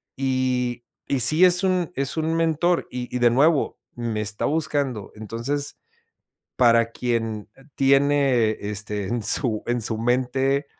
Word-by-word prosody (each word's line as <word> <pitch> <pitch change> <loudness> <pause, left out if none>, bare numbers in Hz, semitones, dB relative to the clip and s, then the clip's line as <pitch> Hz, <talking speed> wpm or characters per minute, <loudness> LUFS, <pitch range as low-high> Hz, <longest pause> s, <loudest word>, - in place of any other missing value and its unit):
y 130 -2 -1 0.2
y 135 - 0
sí 155 +9 +5
es 180 +1 +5
un 185 -2 0
es 140 +3 -3
un 160 +1 0
mentor 165 +1 +1
y 125 0 -6
y - - 0
de 120 -1 +4
nuevo, 145 +5 +2 0.2
me 115 -3 -3
está 105 0 -3
buscando. 140 -8 -2
Entonces, 115 +7 -4 0.8
para 115 -2 +4
quien, 115 -3 -3
eh, 135 - -19
tiene, 135 -4 +3
este, 105 0 -4
en 120 +2 -2
su 110 0 +1
en 120 0 -1
su 110 0 -2
mente, 130 +4 0
125 Hz, 145 wpm, -23 LUFS, 115-145 Hz, 0.8 s, sí